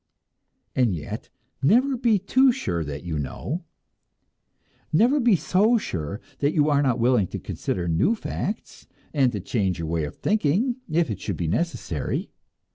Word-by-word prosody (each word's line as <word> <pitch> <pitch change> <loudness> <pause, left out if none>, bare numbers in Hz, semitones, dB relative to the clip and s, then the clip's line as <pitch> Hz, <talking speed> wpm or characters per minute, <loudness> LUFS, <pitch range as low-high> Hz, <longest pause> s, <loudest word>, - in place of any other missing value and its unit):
And 120 -7 +3
yet, 75 - -6 0.3
never 250 - +4
be 235 -3 +3
too 260 +7 +4
sure 235 - -2
that 75 -1 -6
you 80 -4 -3
know! 150 - -4 1.3
Never 240 - +4
be 240 -5 +5
so 210 +7 +3
sure, 95 - -4 0.2
that 145 +3 +1
you 150 -1 +3
are 145 0 +4
not 130 -4 +2
willing 120 -5 +3
to - - -5
consider 90 -2 -3
new 90 - +2
facts, 210 -1 -5 0.3
and 135 -5 +3
to 105 - -3
change 95 -1 -1
your 85 -2 -4
way 80 -1 0
of 75 - -7
thinking 215 - +1
if 160 -5 +1
it 100 - -4
should - - -3
be 85 - -2
necessary. 85 - -2
145 Hz, 160 wpm, -25 LUFS, -, 1.3 s, be